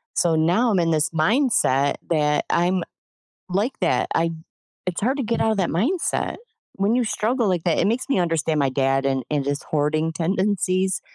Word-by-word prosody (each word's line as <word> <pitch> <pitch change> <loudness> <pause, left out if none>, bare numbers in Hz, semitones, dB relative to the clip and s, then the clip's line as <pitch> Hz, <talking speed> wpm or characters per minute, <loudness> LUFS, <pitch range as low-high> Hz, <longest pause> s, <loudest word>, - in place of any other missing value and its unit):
So 165 -2 +2
now 180 +10 +2
I'm 190 - +2
in 165 -1 +1
this 155 -1 +1
mindset 160 - +2
that 150 -2 +1
I'm 175 +1 +1 0.7
like 205 +8 -1
that. - - +1
I 165 0 +1 0.6
it's 180 - -2
hard 255 +6 0
to - - 0
get 230 +1 -1
outta 220 -1 +2
that 190 -3 0
mindset. 280 - -1 0.4
When 200 +4 +1
you 250 - +2
struggle 230 +1 0
like 175 -3 -1
that, 170 -3 +1
it - - +2
makes 235 +4 0
me 275 - +1
understand 165 -3 0
my 135 - +2
dad 135 0 +1
and 135 -2 -1
and 145 -2 0
his 145 0 -2
hoarding 155 +2 0
tendencies 185 +2 0
175 Hz, 185 wpm, -22 LUFS, 155-210 Hz, 0.7 s, So